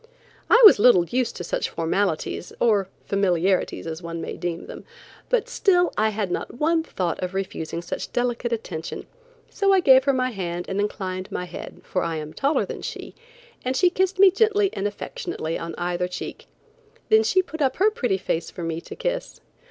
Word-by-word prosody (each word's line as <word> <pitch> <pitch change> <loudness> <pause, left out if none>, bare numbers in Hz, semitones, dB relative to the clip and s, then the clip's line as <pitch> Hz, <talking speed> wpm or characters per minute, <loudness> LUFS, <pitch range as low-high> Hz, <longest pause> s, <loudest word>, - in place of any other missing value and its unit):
I 465 - +7
was 405 - +9
little 205 -6 +6
used 245 +4 -1
to - - -5
such - - -2
formalities, 165 0 -1
or 205 -5 +2 0.2
familiarities, 190 -1 +1
as 165 +1 -5
one 170 -1 -5
may 165 - -5
deem 175 -1 -4
them, - - -9 0.5
but - - +1
still 355 -4 +2
I 220 +1 +2
had 205 -3 -3
not - - -4
one 320 +5 +2
thought 180 - -3
of 180 +1 -4
refusing 170 -3 -4
such - - -5
delicate 240 -1 -1
attention, 180 -8 -4 0.5
so 395 -2 +2
I 385 - +5
gave 265 -6 +6
her 275 - +3
my 255 -1 0
hand 175 -4 -4
and 190 - -2
inclined 185 -2 -3
my 180 - -3
head, 175 - -9
for 185 - -2
I 165 -1 -2
am 155 0 -6
taller 280 +3 +1
than - - -7
she, - - -7 0.5
and 255 +1 -1
she 360 -1 +4
kissed 380 +1 0
me 385 0 +7
gently 415 -1 +2
and 195 - -1
affectionately 205 - -5
on 165 -1 -6
either 175 0 -1
check. 180 - -7 0.6
Then 440 0 +6
she 375 -4 +2
put 320 -1 -8
up 270 -2 +2
her 415 +4 +3
pretty 245 - 0
face 170 -3 -2
for 175 - -8
me 165 0 -3
to - - -10
kiss. - - -3
205 Hz, 190 wpm, -24 LUFS, -, 0.6 s, was